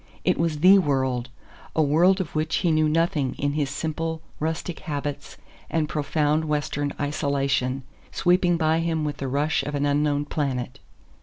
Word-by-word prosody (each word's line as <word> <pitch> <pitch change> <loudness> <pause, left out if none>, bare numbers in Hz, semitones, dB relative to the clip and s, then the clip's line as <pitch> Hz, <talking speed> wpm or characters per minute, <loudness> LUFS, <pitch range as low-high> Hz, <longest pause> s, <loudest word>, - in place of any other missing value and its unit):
It - - +2
was 160 -3 0
THE 190 +3 +8
world 130 -6 0 0.5
a 160 - +4
world 170 +7 +4
of 185 -5 -4
which 155 +1 0
he 170 - +1
knew 155 -1 +3
nothing 155 -4 +1
in 145 0 -1
his 145 -2 0
simple, 160 +2 -3 0.2
rustic 160 +2 -3
habits 145 -1 -5 0.3
and 160 -2 0
profound 150 +1 0
Western 145 -1 -1
isolation 140 -2 0 0.3
sweeping 175 -1 +2
by 160 0 +2
him 165 -2 -1
with 145 -2 -3
the 135 - -4
rush 145 +4 +1
of 145 - -4
an 145 0 0
unknown 145 0 +1
planet. 130 -5 -3
150 Hz, 160 wpm, -24 LUFS, 140-160 Hz, 0.5 s, THE